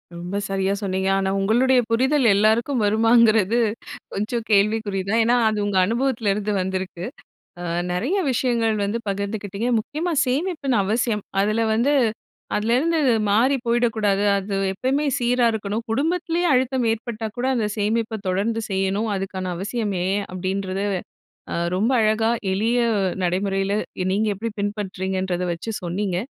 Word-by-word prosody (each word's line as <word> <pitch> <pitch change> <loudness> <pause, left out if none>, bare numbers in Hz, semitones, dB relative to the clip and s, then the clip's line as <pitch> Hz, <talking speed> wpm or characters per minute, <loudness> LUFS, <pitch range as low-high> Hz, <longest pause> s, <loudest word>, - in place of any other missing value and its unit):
ரொம்ப 175 +4 -4
சரியா 195 0 0
சொன்னீங்க, 190 -1 -1
ஆனா 195 0 0
உங்களுடைய 245 +6 +3
புரிதல் 265 +4 +2
எல்லாருக்கும் 225 +4 +2
வருமாங்கறது 225 0 +4 0.5
கொஞ்சம் 220 +3 -2
கேள்விக்குறி 205 -1 +2
தான். 225 +2 +3
ஏன்னா 240 +2 +3
அது 215 - -2
உங்க 205 -2 0
அனுபவத்துல 230 -2 0
இருந்து 210 +1 -2
வந்திருக்கு. 185 -1 -4 0.6
அ - - -5 0.3
நெறய 250 - 0
விஷயங்கள் 230 -3 +1
வந்து 210 +4 -1
பகிர்ந்துக்கிட்டீங்க. 200 +2 -3
முக்கியமா 310 +10 -3
சேமிப்பின் 280 -1 0
அவசியம். 215 +1 0 0.2
அதுல 215 +3 +1
வந்து, 245 +6 +2 0.6
அதிலேருந்து 255 +10 +1 0.3
மாறி 250 +7 +3
போயிடக்கூடாது, 220 -4 +1
அது 195 +1 -3 0.2
எப்பயுமே 270 +8 0
சீரா 245 0 +2
இருக்கணும். 215 +1 -3
குடும்பத்திலயே 335 +6 0
அழுத்தம் 255 -1 +1
ஏற்பட்டா 225 0 -4
கூட 250 +2 -1
அந்த 220 - 0
சேமிப்ப 220 +1 -1
தொடர்ந்து 220 +5 0
செய்யணும். 195 +3 0
அதுக்கான 190 -1 -4
அவசியம் 205 +1 -2
ஏன் 200 +2 0
அப்படின்றது. 190 +1 -2 0.7
அ - - -2 0.2
ரொம்ப 220 +7 +1
அழகா, 220 +1 +2 0.2
எளிய 225 +5 +1 0.5
நடைமுறைல, 195 +2 0 0.4
நீங்க 215 +2 +1
எப்படி 230 +3 -4
பின்பற்றீங்கங்கறத 190 -3 -2
வச்சு 195 +7 -6
சொன்னீங்க. 180 +1 -2
215 Hz, 130 wpm, -22 LUFS, 195-240 Hz, 0.7 s, வருமாங்கறது